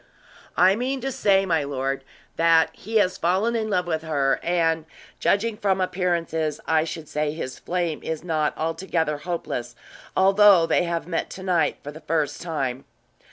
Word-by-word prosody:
"I 185 +2 +5
mean 260 +4 -2
to 270 +2 -2
say, 195 -5 +3
my 165 -5 +1
lord, 135 -1 -2 0.3
that 165 -1 +4
he 225 +3 -8
has 185 -3 +2
fallen 190 +7 +1
in 220 -1 -1
love 180 -3 +1
with 160 -2 -1
her; 145 -4 0
and, 165 -2 +1 0.3
judging 210 +2 +1
from 195 -3 +1
appearances, 170 -4 -1
I 160 0 +2
should 160 -1 -6
say 150 0 -1
his 130 -5 -6
flame 175 -3 -2
is 160 -1 -4
not 155 -3 -1
altogether 160 -2 -1
hopeless, 165 -7 -4 0.4
although 195 -2 +6
they 175 - +2
have 170 -1 -2
met 170 -2 -2
to 190 - -9
night 180 -4 +1
for 145 - -6
the 155 +2 -12
first 150 -2 -1
time." 140 -6 -3
165 Hz, 165 wpm, -24 LUFS, 155-190 Hz, 0.4 s, although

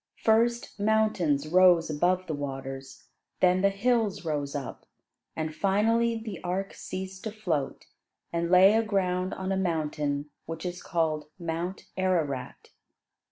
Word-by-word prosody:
First 235 +1 +2
mountains 205 -9 +2
rose 180 0 +5
above 180 +5 +1
the 160 - -3
waters, 135 -2 -6 0.3
then 185 0 +4
the 200 - +5
hills 210 -2 0
rose 145 -2 -2
up, 140 -3 -6 0.5
and 155 -1 -3
finally 225 +6 +2
the 220 -5 -7
ark 190 +2 -2
ceased 190 0 -7
to 220 - -2
float 175 -10 -2 0.5
and 170 0 0
lay 185 +3 +7
aground 190 -4 +1
on 190 0 -3
a 190 - +1
mountain 150 -5 -1 0.2
which 165 +1 -6
is 180 0 -4
called 155 -3 -1
Mount 170 +2 -4
Ararat. 160 -9 -1
180 Hz, 130 wpm, -28 LUFS, 155-195 Hz, 0.5 s, lay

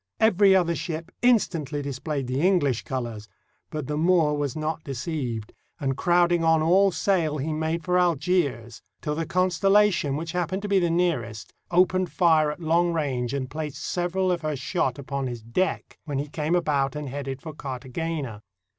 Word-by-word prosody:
Every 200 -3 +5
other 175 -2 +3
ship 165 +1 -5
instantly 165 - +1
displayed 140 +1 -3
the 130 +3 -1
English 165 - +2
colors; 115 -5 -5 0.4
but 155 -3 -4
the 150 +2 -2
Moor 165 -3 +3
was 145 -3 -2
not 155 +1 -3
deceived, 130 -5 -4 0.3
and 135 -2 -1
crowding 175 +1 +3
on 160 -1 +4
all 190 +4 +4
sail 170 -5 +1
he 155 +3 -2
made 160 +2 -2
for 180 0 +2
Algiers, 160 -8 0 0.2
till 150 - -1
the 165 +2 -3
Constellation, 185 -3 +3
which 165 +2 -4
hap 180 -2 -1
pened 190 +2 -3
to - - -2
be 200 -1 +3
nearest, 120 - -1 0.2
opened 185 +1 +2
fire 160 -4 +4
at 150 - -8
long 170 +1 +2
range 130 -7 -1
and 135 -2 -2
placed 150 +1 -5
several 180 +1 0
of 175 - -1
her 155 -2 -2
shot 130 -1 -1
upon 140 -1 -3
his 120 -3 -6
deck, 180 +12 -2
when 145 -3 -3
he 145 +2 -2
came 155 +3 -1
about 145 -5 +1
and 150 -1 -4
headed 135 0 -5
for 155 +2 -8
Cartagena. 135 -2 -5
155 Hz, 175 wpm, -25 LUFS, 135-175 Hz, 0.4 s, Every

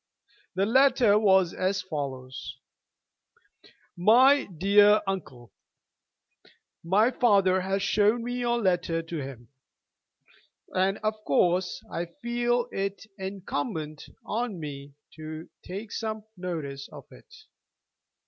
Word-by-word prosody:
The 190 +1 +2
letter 245 -3 +4
was 190 -4 +4
as 190 +1 -1
follows: 130 -6 -6 1.4
"MY 255 +10 +5
DEAR 205 +4 +4
UNCLE, 140 -11 -5 1.3
My 205 +8 +3
father 195 -6 +3
has 195 +1 -1
shown 215 +3 +2
me 245 +1 -3
your 240 -1 +1
letter 175 -5 0
to 165 0 -6
him, 130 -4 -9 1.2
and, 190 +1 +1
of 215 0 +1
course, 180 +4 +1
I 170 +1 -3
feel 240 0 0
it 195 +2 -3
incumbent 160 -5 -4 0.2
on 225 -4 -3
me 140 -2 -8 0.2
to 155 +1 -7 0.2
take 200 +4 -7
some 220 -1 -4
notice 155 -7 -5
of - - -11
it. 465 - -17
190 Hz, 105 wpm, -27 LUFS, 165-215 Hz, 1.4 s, MY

